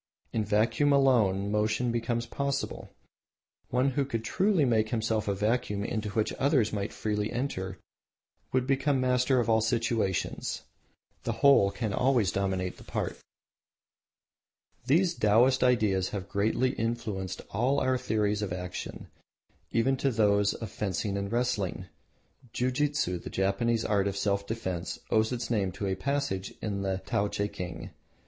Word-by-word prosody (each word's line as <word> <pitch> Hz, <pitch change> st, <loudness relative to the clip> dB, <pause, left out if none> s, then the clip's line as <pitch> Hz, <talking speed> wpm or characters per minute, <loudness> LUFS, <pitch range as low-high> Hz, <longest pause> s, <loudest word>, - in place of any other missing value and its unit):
In 110 Hz, -, +1 dB
vacuum 110 Hz, +8 st, +2 dB
alone 110 Hz, -8 st, +3 dB
motion 110 Hz, +3 st, +1 dB
becomes 120 Hz, 0 st, -1 dB
possible. 140 Hz, +3 st, -3 dB, 0.8 s
One 130 Hz, +2 st, +2 dB
who 140 Hz, +2 st, +1 dB
could 115 Hz, -4 st, -3 dB, 0.2 s
make 125 Hz, -, +3 dB
of -, -, -12 dB
himself 110 Hz, -2 st, 0 dB
a 100 Hz, -, +1 dB
vacuum 105 Hz, 0 st, 0 dB
into 110 Hz, -2 st, -2 dB
which 105 Hz, +2 st, 0 dB
others 130 Hz, -6 st, +2 dB
might 100 Hz, 0 st, -2 dB
freely 105 Hz, 0 st, -2 dB
enter 95 Hz, -7 st, -3 dB, 0.7 s
would 130 Hz, -1 st, +1 dB
become 135 Hz, +1 st, +1 dB
master 125 Hz, 0 st, +2 dB
of 120 Hz, -, 0 dB
all 110 Hz, -1 st, +4 dB
situations. 110 Hz, -4 st, -1 dB, 0.6 s
The 115 Hz, -, -2 dB
whole 135 Hz, -8 st, +7 dB
can 105 Hz, +1 st, -3 dB
always 125 Hz, -5 st, +2 dB
dominate 95 Hz, -2 st, -1 dB
the -, -, -13 dB
part. -, -, -3 dB, 1.7 s
These 170 Hz, +6 st, +3 dB
Taoists' 120 Hz, +2 st, +4 dB
ideas 110 Hz, -7 st, +2 dB
have 100 Hz, -2 st, -5 dB
greatly 110 Hz, +6 st, +1 dB
influenced 105 Hz, -6 st, -3 dB
all 125 Hz, +7 st, +1 dB
our 130 Hz, 0 st, +2 dB
theories 105 Hz, -2 st, 0 dB
of 100 Hz, -3 st, -3 dB
action, 90 Hz, 0 st, -5 dB, 0.7 s
even 130 Hz, +4 st, +2 dB
to 135 Hz, -, +1 dB
those 105 Hz, -3 st, +2 dB
of 110 Hz, -4 st, -6 dB
fencing 100 Hz, 0 st, -2 dB
and 100 Hz, 0 st, -3 dB
wrestling. 105 Hz, -7 st, -1 dB, 0.7 s
Jiu 125 Hz, +1 st, 0 dB
jitsu, 140 Hz, -10 st, 0 dB
the -, -, -8 dB
Japanese 110 Hz, +4 st, 0 dB
art 100 Hz, -2 st, +2 dB
of 100 Hz, 0 st, -2 dB
self 100 Hz, 0 st, 0 dB
defence, 95 Hz, -7 st, -3 dB
owes 110 Hz, +1 st, +3 dB
its 120 Hz, -1 st, -3 dB
name 100 Hz, -5 st, +1 dB
to 100 Hz, +2 st, -4 dB
a 95 Hz, -, 0 dB
passage 100 Hz, -3 st, -2 dB
in 100 Hz, -2 st, -3 dB
the 95 Hz, -1 st, -2 dB
Tao 100 Hz, +1 st, +1 dB
teking. 100 Hz, -4 st, -4 dB
110 Hz, 145 wpm, -29 LUFS, 100-125 Hz, 1.7 s, whole